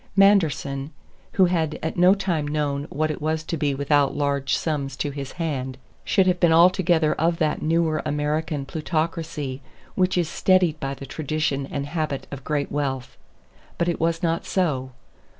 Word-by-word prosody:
Manderson, 160 Hz, -8 st, +3 dB, 0.4 s
who 190 Hz, -, +5 dB
had 160 Hz, -4 st, 0 dB
at 160 Hz, -, -2 dB
no 180 Hz, +2 st, +6 dB
time 175 Hz, -7 st, -1 dB
known 145 Hz, -1 st, -1 dB
what 155 Hz, +1 st, -1 dB
it 150 Hz, -, -6 dB
was 155 Hz, +1 st, -1 dB
to 165 Hz, -, -3 dB
be 145 Hz, -3 st, 0 dB
without 140 Hz, 0 st, +2 dB
large 140 Hz, -2 st, 0 dB
sums 145 Hz, -4 st, -2 dB
to 145 Hz, -, -2 dB
his 140 Hz, -1 st, -6 dB
hand, 135 Hz, -6 st, -3 dB, 0.3 s
should 190 Hz, -2 st, +3 dB
have 180 Hz, -1 st, +2 dB
been 170 Hz, -2 st, +4 dB
altogether 170 Hz, -2 st, +4 dB
of 165 Hz, +2 st, +1 dB
that 155 Hz, -3 st, 0 dB
newer 160 Hz, -1 st, +1 dB
American 150 Hz, 0 st, -1 dB
plutocracy 155 Hz, -2 st, -3 dB, 0.3 s
which 185 Hz, 0 st, +1 dB
is 175 Hz, -2 st, +2 dB
steadied 180 Hz, -2 st, +2 dB
by 135 Hz, 0 st, -3 dB
the 135 Hz, -, -9 dB
tradition 145 Hz, -1 st, -2 dB
and 140 Hz, -1 st, -3 dB
habit 155 Hz, -2 st, -3 dB
of 140 Hz, -2 st, -7 dB
great 145 Hz, -1 st, -1 dB
wealth. 135 Hz, -3 st, -2 dB, 0.6 s
But 170 Hz, -, 0 dB
it 170 Hz, -, -1 dB
was 165 Hz, +1 st, 0 dB
not 165 Hz, 0 st, 0 dB
so. 145 Hz, -9 st, 0 dB
155 Hz, 170 wpm, -24 LUFS, 140-170 Hz, 0.6 s, no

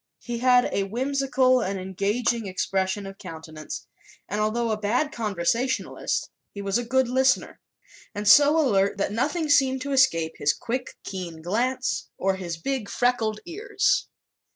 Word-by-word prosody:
He 240 Hz, -1 st, -4 dB
had 250 Hz, 0 st, +4 dB
a 200 Hz, -, 0 dB
whimsical 260 Hz, +3 st, +2 dB
but 200 Hz, -4 st, -2 dB
engaging 200 Hz, +5 st, -1 dB
expression 190 Hz, +1 st, -1 dB
of 195 Hz, 0 st, -9 dB
countenance, 160 Hz, -3 st, -8 dB, 0.4 s
and 210 Hz, +2 st, -2 dB
although 225 Hz, +2 st, 0 dB
a 215 Hz, -, -1 dB
bad 245 Hz, +8 st, +1 dB
conversationalist 230 Hz, -, -1 dB, 0.2 s
he 200 Hz, -, -10 dB
was 200 Hz, +3 st, 0 dB
a -, -, -2 dB
good 260 Hz, +2 st, +2 dB
listener 260 Hz, +1 st, +1 dB, 0.6 s
and 205 Hz, 0 st, -3 dB
so 290 Hz, +9 st, +7 dB
alert 200 Hz, -9 st, +2 dB
that 195 Hz, -, -1 dB
nothing 305 Hz, +9 st, -1 dB
seemed 265 Hz, -2 st, +3 dB
to 280 Hz, -, -4 dB
escape 170 Hz, -13 st, +2 dB
his 145 Hz, -, +2 dB
quick, 250 Hz, +2 st, -4 dB
keen 175 Hz, -5 st, -6 dB
glance 235 Hz, -1 st, -1 dB
or 190 Hz, 0 st, 0 dB
his 175 Hz, -3 st, -5 dB
big 255 Hz, +3 st, -3 dB
freckled 230 Hz, -4 st, 0 dB
ears. 395 Hz, +8 st, 0 dB
225 Hz, 150 wpm, -25 LUFS, 195-260 Hz, 0.6 s, so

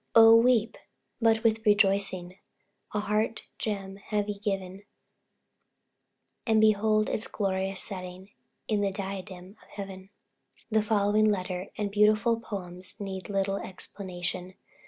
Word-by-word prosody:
Oh, 225 Hz, 0 st, +9 dB
weep! 230 Hz, -1 st, +3 dB, 0.4 s
but 225 Hz, 0 st, +3 dB
with 225 Hz, -1 st, +2 dB
rejoicing; 195 Hz, -3 st, +2 dB, 0.5 s
A 210 Hz, -, -1 dB
heart 210 Hz, +2 st, -1 dB, 0.2 s
gem 195 Hz, -3 st, -3 dB
have 210 Hz, -1 st, 0 dB
ye 205 Hz, -1 st, -4 dB
given, 195 Hz, -2 st, -3 dB, 1.7 s
And 220 Hz, -1 st, +4 dB
behold 215 Hz, 0 st, +3 dB
its 215 Hz, -, -2 dB
glorious 190 Hz, -1 st, -2 dB
setting 185 Hz, 0 st, -8 dB, 0.4 s
In 210 Hz, -2 st, +1 dB
the 200 Hz, -, +2 dB
diadem 190 Hz, 0 st, -7 dB
of -, -, -20 dB
Heaven. 195 Hz, -1 st, -8 dB, 0.6 s
The 220 Hz, 0 st, +4 dB
following 210 Hz, 0 st, +3 dB
letter 185 Hz, -2 st, -2 dB
and 205 Hz, -1 st, -2 dB
beautiful 215 Hz, +3 st, +3 dB
poems 185 Hz, -4 st, -7 dB
need 195 Hz, -1 st, -6 dB
little 195 Hz, 0 st, 0 dB
explanation. 185 Hz, -1 st, -4 dB
200 Hz, 120 wpm, -28 LUFS, 190-215 Hz, 1.7 s, Oh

